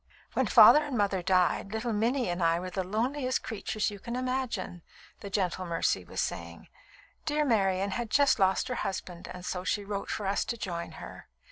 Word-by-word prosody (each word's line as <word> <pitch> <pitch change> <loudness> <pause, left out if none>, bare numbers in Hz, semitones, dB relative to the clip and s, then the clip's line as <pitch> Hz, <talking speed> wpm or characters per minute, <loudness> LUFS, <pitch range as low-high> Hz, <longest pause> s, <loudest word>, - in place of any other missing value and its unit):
"] - - -30
"When - - +1
father 300 - +8
and 265 -4 -3
mother 200 -3 +1
died, 185 +1 +2
little 225 +1 -2
Minnie 235 +4 +1
and 175 +1 -2
I 165 0 +3
were 185 +1 -6
the 190 +1 -2
loneliest 255 +7 -1
creatures 215 0 -2
you 205 - -9
can 235 +4 -5
imagine," 255 -8 -3 0.4
the 200 - -7
gentle 185 -2 -1
Mercy 165 -1 0
was - - -7
saying. - - -4 0.6
"Dear 300 0 +1
Marian 195 -5 +1
had 235 +3 -3
just 280 0 +4
lost 190 0 +2
her 250 - -2
husband, 180 -2 -5
and 180 0 -9
so 180 0 -3
she 205 +2 -1
wrote 200 0 -4
for 210 - -3
us 195 +1 +1
to 235 - -3
join 170 -5 -5
her. - - -10
200 Hz, 200 wpm, -29 LUFS, 185-240 Hz, 0.6 s, father